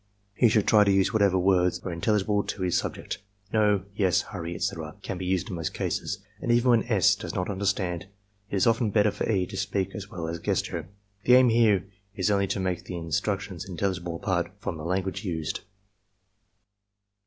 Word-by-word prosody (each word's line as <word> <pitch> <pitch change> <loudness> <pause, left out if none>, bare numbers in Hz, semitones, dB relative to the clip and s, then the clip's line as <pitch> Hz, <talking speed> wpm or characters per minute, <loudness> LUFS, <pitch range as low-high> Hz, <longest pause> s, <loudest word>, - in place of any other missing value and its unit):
He 115 +3 +4
should 110 -2 +2
try 105 -2 +6
to 100 - +3
use 95 +3 +3
whatever 100 -4 +3
words 90 -1 +3
are 95 - -4
in 85 0 -6
telligible 105 0 +1
to 95 - -3
his 90 -2 +1
subject. - - -3 0.3
"No," 105 -3 +3
"Yes," 95 -3 +3
"Hurry," 85 -4 -6
etc., - - -3
can 90 - -4
be 90 - -4
used 95 +3 0
in - - -3
most 80 -2 -4
cases; - - -2 0.2
and 120 - 0
even 120 +1 +4
when 115 -2 +4
S. 105 -7 +4
does - - -6
not 90 +2 -1
understand, 95 -2 -1 0.4
it - - -3
is 95 - +3
often 115 -1 +3
better 105 0 +3
for 105 +2 -2
E. 95 -4 +2
to 95 - -9
speak 95 0 -1
as 100 -2 -7
well 85 -2 -5
as 85 +1 -4
gesture. - - -2 0.4
The 125 - +7
aim 130 -1 +6
here 110 -5 +4 0.3
is 95 +1 +1
only 100 -1 +2
to 100 - -2
make 95 -1 -2
the 90 - -5
instructions 95 +3 -2
intelligible 90 -1 -2
apart - - -1
from - - -4
the 75 - -7
language 95 +3 -2
used. 80 -5 -3
95 Hz, 200 wpm, -27 LUFS, 90-105 Hz, 0.4 s, The